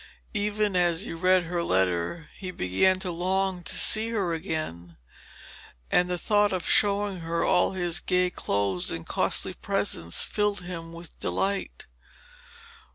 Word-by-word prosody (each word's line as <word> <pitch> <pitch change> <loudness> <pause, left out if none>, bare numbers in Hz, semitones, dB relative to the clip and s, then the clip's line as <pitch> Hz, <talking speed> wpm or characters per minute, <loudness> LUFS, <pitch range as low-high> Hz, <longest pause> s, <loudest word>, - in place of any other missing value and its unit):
Even 210 -1 0
as 175 -1 +2
he 205 - -5
read 185 +2 +3
her 175 +1 -2
letter 95 - 0
he 185 - -7
began 185 - +2
to 185 - -2
long 185 +1 -1
to - - 0
see 220 +1 +4
her 200 -7 -1
again, 155 - -5 0.9
and 180 0 +3
the 180 - -1
thought 205 +3 +2
of 185 -3 -3
showing 200 -2 +2
her 165 0 -1
all 180 - +3
his 175 -1 -1
gay 180 0 +1
clothes 100 - -1
and 85 -1 -4
costly - - +1
presents 85 0 0
filled 205 -2 0
him 170 -2 -7
with 170 0 -11
delight. 195 0 -2
180 Hz, 145 wpm, -26 LUFS, 165-195 Hz, 0.9 s, see